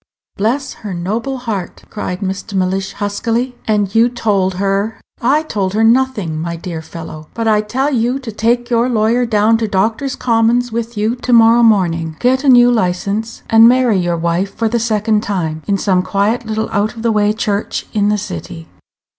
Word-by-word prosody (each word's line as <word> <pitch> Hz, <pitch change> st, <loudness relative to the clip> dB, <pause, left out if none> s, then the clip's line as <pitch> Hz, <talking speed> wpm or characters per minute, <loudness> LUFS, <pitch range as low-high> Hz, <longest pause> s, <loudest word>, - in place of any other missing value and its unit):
"Bless 245 Hz, +7 st, -1 dB
her 200 Hz, -4 st, -5 dB
noble 220 Hz, +10 st, -3 dB
heart!" 220 Hz, -7 st, -5 dB
cried 185 Hz, -2 st, -4 dB
Mr. 195 Hz, +2 st, -4 dB
Mellish, 190 Hz, +1 st, -1 dB
huskily. 230 Hz, +5 st, -2 dB
"And 205 Hz, -3 st, 0 dB
you 230 Hz, +2 st, +4 dB
told 200 Hz, -6 st, 0 dB
her 200 Hz, +3 st, -1 dB
" -, -, -37 dB, 0.2 s
"I 310 Hz, -, -1 dB
told 200 Hz, -9 st, -2 dB
her 220 Hz, -, +2 dB
nothing, 225 Hz, -9 st, +1 dB
my 170 Hz, +1 st, -3 dB
dear 165 Hz, -1 st, -6 dB
fellow; 155 Hz, -1 st, -9 dB
but 230 Hz, -1 st, -2 dB
I 210 Hz, -1 st, +3 dB
tell 260 Hz, +7 st, -1 dB
you 245 Hz, +2 st, +1 dB
to 255 Hz, -4 st, -7 dB
take 240 Hz, +3 st, 0 dB
your 235 Hz, +1 st, +2 dB
lawyer 235 Hz, +1 st, +1 dB
down 220 Hz, 0 st, +2 dB
to 225 Hz, -, -1 dB
Doctor's 220 Hz, +7 st, -1 dB
Commons 235 Hz, +1 st, +1 dB
with 230 Hz, 0 st, -4 dB
you 215 Hz, +3 st, 0 dB
to 245 Hz, 0 st, -1 dB
morrow 230 Hz, 0 st, +6 dB
morning, 170 Hz, -8 st, +2 dB
get 260 Hz, +2 st, +2 dB
a 280 Hz, -, +3 dB
new 245 Hz, -1 st, +6 dB
license, 205 Hz, +2 st, -2 dB
and 225 Hz, +1 st, +7 dB
marry 245 Hz, -5 st, +3 dB
your 175 Hz, -1 st, -1 dB
wife 170 Hz, +4 st, -1 dB
for 225 Hz, 0 st, 0 dB
the 235 Hz, +2 st, 0 dB
second 215 Hz, -1 st, +1 dB
time, 165 Hz, -7 st, -3 dB
in 200 Hz, -1 st, +1 dB
some 190 Hz, -2 st, +1 dB
quiet 210 Hz, +5 st, -1 dB
little 220 Hz, 0 st, -2 dB
out 215 Hz, +2 st, -1 dB
of 225 Hz, -, -8 dB
the 230 Hz, -, +2 dB
way 210 Hz, -1 st, +2 dB
church 210 Hz, -2 st, -2 dB
in 205 Hz, -1 st, +1 dB
the 210 Hz, -, +1 dB
city." 170 Hz, -4 st, -7 dB
215 Hz, 190 wpm, -16 LUFS, 195-235 Hz, 0.2 s, and